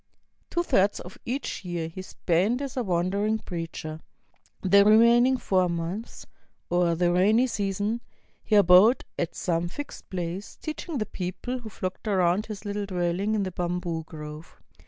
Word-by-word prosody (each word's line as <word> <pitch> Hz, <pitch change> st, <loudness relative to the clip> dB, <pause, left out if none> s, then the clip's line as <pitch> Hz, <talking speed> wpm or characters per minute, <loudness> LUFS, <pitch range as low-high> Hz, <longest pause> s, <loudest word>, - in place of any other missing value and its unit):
Two 345 Hz, -, 0 dB
thirds 200 Hz, -, +2 dB
of 180 Hz, -, -10 dB
each 245 Hz, -4 st, -3 dB
year 175 Hz, -3 st, -3 dB
he 165 Hz, +3 st, -7 dB
spent 185 Hz, +6 st, 0 dB
as 275 Hz, -2 st, -5 dB
a 255 Hz, -, 0 dB
wander 185 Hz, 0 st, 0 dB
ing 215 Hz, +1 st, +1 dB
preacher. 165 Hz, -4 st, -6 dB, 0.6 s
The 200 Hz, +1 st, +6 dB
remaining 235 Hz, +4 st, +6 dB
four 185 Hz, -6 st, +1 dB
months, 170 Hz, +6 st, -4 dB, 0.5 s
or 175 Hz, -1 st, +3 dB
the 175 Hz, +1 st, +2 dB
rainy 210 Hz, +7 st, +4 dB
season, 205 Hz, 0 st, -1 dB, 0.4 s
he 215 Hz, -, +1 dB
abode 200 Hz, +5 st, +6 dB
at 170 Hz, -, -2 dB
some 170 Hz, -1 st, -1 dB
ILxcd 290 Hz, +10 st, -8 dB
place, 180 Hz, +2 st, -4 dB
teaching 310 Hz, 0 st, -5 dB
the 215 Hz, -, -1 dB
people 200 Hz, +9 st, -4 dB
who 230 Hz, -2 st, -8 dB
flocked 185 Hz, +1 st, -5 dB
around 190 Hz, 0 st, +2 dB
his 215 Hz, -1 st, -7 dB
little 205 Hz, 0 st, -3 dB
dwelHng 185 Hz, +3 st, 0 dB
in 205 Hz, -, +1 dB
the 185 Hz, -, -3 dB
bamboo 175 Hz, -2 st, -2 dB
grove. 150 Hz, 0 st, -10 dB
190 Hz, 155 wpm, -26 LUFS, 175-220 Hz, 0.6 s, The